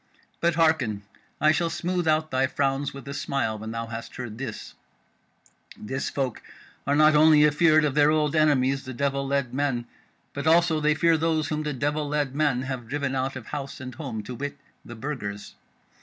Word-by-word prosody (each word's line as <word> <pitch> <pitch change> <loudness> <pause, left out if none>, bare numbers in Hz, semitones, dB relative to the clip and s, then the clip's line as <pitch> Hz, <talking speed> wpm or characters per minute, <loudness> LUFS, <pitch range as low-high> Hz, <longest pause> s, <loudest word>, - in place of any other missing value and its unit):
But 170 -1 +1
hearken. 140 -11 +2 0.4
I 155 +1 +5
shall 165 +2 +1
smooth 175 +1 -2
out 155 0 +2
thy 130 0 +2
frowns 135 0 -1
with 135 -2 -11
a 140 - -5
smile 120 -6 -2
when 110 +1 -6
thou 115 0 -4
hast 115 0 -7
heard 120 -3 -7
this: 125 -5 -6 1.0
this 130 +5 -4
folk 130 -4 -3 0.5
are 140 - +3
not 155 +1 +5
only 150 0 +6
afeard 155 +1 +4
of 145 - 0
their 145 0 +4
old 155 -1 +1
enemies, 135 -3 +3
the 130 -1 -7
devil 140 +1 -1
led 140 -3 -1
men, 135 -3 -1 0.5
but 145 +2 -3
also 165 -1 +4
they 150 0 +2
fear 165 +1 +3
those 155 -2 0
whom 155 0 -1
the 150 -1 -3
devil 145 +3 -1
led 145 -2 -1
men 145 -4 +1
have 130 -3 -5
driven 140 +1 -2
out 135 0 -1
of 130 -4 -7
house 140 -2 -6
and 130 -1 -7
home, 120 -9 -5
to 125 - -7
wit, 145 +3 -5 0.3
the 120 - -10
Burgers. 110 -6 -5
140 Hz, 190 wpm, -25 LUFS, 130-155 Hz, 1.0 s, only